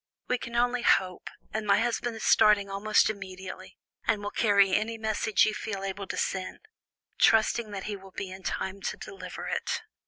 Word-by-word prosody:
We 250 - 0
can 235 - -7
only 245 +1 +2
hope, 185 -5 +2 0.3
and 215 -1 -2
my 200 - +5
husband 235 0 -1
is 220 - -7
starting 205 -2 +5
almost 210 +2 +3
immediately, 190 -2 -7 0.3
and 205 -2 +1
will 205 - -3
carry 200 -3 +4
any 220 +3 0
message 220 0 +2
you 215 - 0
feel 200 -2 -4
able 195 0 -4
to - - -4
send, 185 -1 -2 0.6
trusting 225 0 +4
that 195 -2 -5
he 210 - -4
will 195 -1 -12
be 190 0 -6
in 190 +1 -9
time 190 +1 -3
to - - -3
deliver 390 +1 -8
it." - - -2
205 Hz, 185 wpm, -28 LUFS, 195-225 Hz, 0.6 s, my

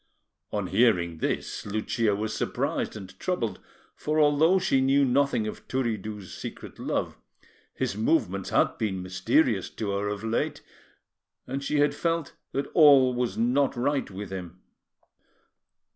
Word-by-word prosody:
On 105 -2 -1
hearing 90 -4 +2
this, - - -2
Lucia 110 +1 0
was 110 +2 -3
surprised - - -2
and 95 -3 -10
troubled; 115 - -2 0.4
for, 155 +1 -1
although 155 +5 +5
she 135 -7 +2
knew 135 +1 +4
nothing 135 -3 +2
of 110 - -7
Turiddu's 110 -6 -3
secret - - -8
love, - - -2 0.6
his - - -2
movements 105 - 0
had - - +2
been 95 -4 -2
mysterious 95 - +1
to 105 -2 -4
her 100 +1 -1
of 105 +1 -4
late, 115 0 -1 0.8
and 135 +2 -4
she 150 - 0
had 145 0 +3
felt 165 0 -1 0.2
that 140 +1 -1
all 140 -5 +7
was 125 -1 -2
not 130 +4 +2
right 135 +3 0
with 95 0 -7
him. 90 -2 -7
115 Hz, 140 wpm, -27 LUFS, 100-140 Hz, 0.8 s, all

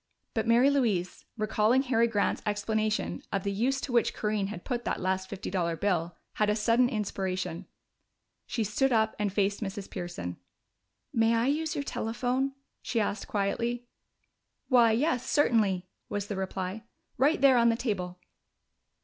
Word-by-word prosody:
But 220 0 -1
Mary 240 +4 +5
Louise, 215 -10 0
recalling 220 +4 +2
Harry 235 -3 +3
Grant's 205 -3 0
explanation 215 +1 -1
of 195 - -1
the 200 - -1
use 250 +7 +1
to 265 - -4
which 235 -1 +2
Corinne 210 -2 -1
had 190 -4 -7
put 240 -2 -2
that - - -2
last 190 0 -1
fifty 200 0 -5
dollar 170 -3 0
bill, 175 -2 -1 0.2
had 210 - +4
a 210 - +2
sudden 235 +3 +3
inspiration. 190 -6 -3 0.8
She 230 - -1
stood 245 +6 +1
up 220 -2 +2
and 205 -1 0
faced 200 +1 0
Mrs. 195 -1 -5
Pearson. 175 - -5 0.8
"May 225 0 +3
I 230 +1 +2
use 305 +3 0
your 285 - -1
telephone?" 255 +3 -1 0.3
she 235 - -1
asked 210 0 -1
quietly. 235 +4 -1 0.8
"Why, 240 -4 +6
yes, 250 +2 +1
certainly," 210 -10 +2 0.2
was 205 -1 -2
the 205 - -4
reply. 190 +2 -3 0.4
"Right 290 +5 +4
there 265 -2 +6
on 235 0 +5
the 230 - +3
table." 185 -7 -3
215 Hz, 160 wpm, -29 LUFS, 195-240 Hz, 0.8 s, Why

